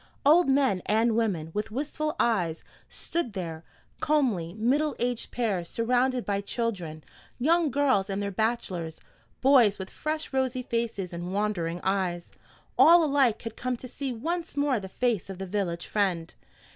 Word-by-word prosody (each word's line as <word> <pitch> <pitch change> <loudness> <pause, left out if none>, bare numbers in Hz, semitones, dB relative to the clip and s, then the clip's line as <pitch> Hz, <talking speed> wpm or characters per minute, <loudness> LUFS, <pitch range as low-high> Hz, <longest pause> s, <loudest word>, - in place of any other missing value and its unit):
Old 315 +2 +6
men 265 -9 +3
and 220 +2 +3
women, 185 -9 0
with 210 +1 -2
wistful 305 +6 -3
eyes, 175 -9 +1 0.3
stood 330 -10 -3
there; 165 -4 -5 0.4
comely 225 - +1
middle 270 +7 +1
aged 245 -1 -2
pairs, 200 -8 -1
surrounded 250 +2 +1
by 200 -1 0
children; 190 -9 -3 0.3
young 320 +5 +3
girls 260 -8 +2
and 195 0 -2
their 200 0 -2
bachelors; 190 -6 -2 0.4
boys 255 -7 +5
with 190 0 -7
fresh 310 -1 -4
rosy 260 -1 0
faces 230 -7 -2
and 175 +2 -4
wondering 180 -5 -1
eyes, 185 -3 -1 0.5
all 340 +1 +8
alike 275 -6 +2
had 230 -1 -6
come 255 0 -2
to 255 - -9
see 270 +2 -4
once 330 +7 -3
more 285 -4 +2
the 190 -1 -8
face 230 -3 -1
of 190 - -6
the 190 - -5
village 180 -3 -2
friend. 185 -6 -1
225 Hz, 155 wpm, -27 LUFS, 190-265 Hz, 0.5 s, all